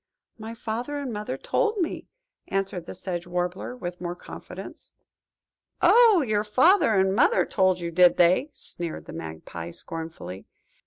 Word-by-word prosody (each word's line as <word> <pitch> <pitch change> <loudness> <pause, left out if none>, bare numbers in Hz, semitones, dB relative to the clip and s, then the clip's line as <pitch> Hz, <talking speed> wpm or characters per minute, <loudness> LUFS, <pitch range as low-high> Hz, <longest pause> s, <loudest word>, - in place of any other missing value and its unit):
"My 220 +1 -7
father 235 +6 -4
and 275 -4 -4
mother 210 +4 -4
told 485 -3 0
me 345 -5 -2 0.4
that," - - -6
answered 190 -3 -1
the - - -8
Sedge 175 -1 -5
Warbler, 180 +6 -3
with 175 -5 -6
more 175 0 -3
confidence. - - -10 0.9
"Oh, 450 -8 +6
your 210 -1 +1
father 260 - +4
and 190 0 +3
mother 325 - +4
told 185 -2 +2
you, 170 -1 -4
did 180 +1 +5
they?" 180 - +4
sneered 170 - -6
the - - -9
Magpie, 80 +1 -7
scornfully. 160 - -7
190 Hz, 150 wpm, -26 LUFS, 175-255 Hz, 0.9 s, Oh